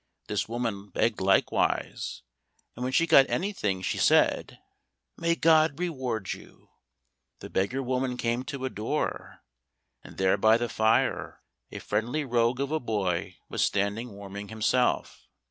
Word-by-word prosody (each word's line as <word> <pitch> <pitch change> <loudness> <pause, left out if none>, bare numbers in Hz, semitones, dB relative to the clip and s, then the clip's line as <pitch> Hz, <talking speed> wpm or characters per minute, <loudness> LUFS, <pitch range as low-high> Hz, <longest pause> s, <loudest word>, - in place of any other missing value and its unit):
This - - -2
woman 115 -4 -3
begged 110 -1 0
likewise, 95 0 +1 0.5
and 120 - -9
when 130 - -1
she 165 +5 +3
got 135 -4 +6
anything 105 - -1
she - - -1
said, - - +3 0.6
"May 170 0 +1
God 160 -3 +4
reward 130 - -2
you." - - -15 0.7
The - - -10
beggar 125 +8 0
woman 125 0 -1
came 120 0 0
to 140 -2 -5
a - - -1
door, 115 +9 -3 0.6
and - - -13
there 95 +1 +3
by 110 +2 +5
the 120 0 -2
fire 110 +1 +1 0.3
a - - -8
friendly 120 +9 -2
rogue 120 0 +1
of 140 +1 -2
a 160 - +1
boy 95 - -2
was - - -1
standing 100 +4 0
warming 100 0 -8
himself. 110 +3 0
120 Hz, 145 wpm, -27 LUFS, 100-135 Hz, 0.7 s, got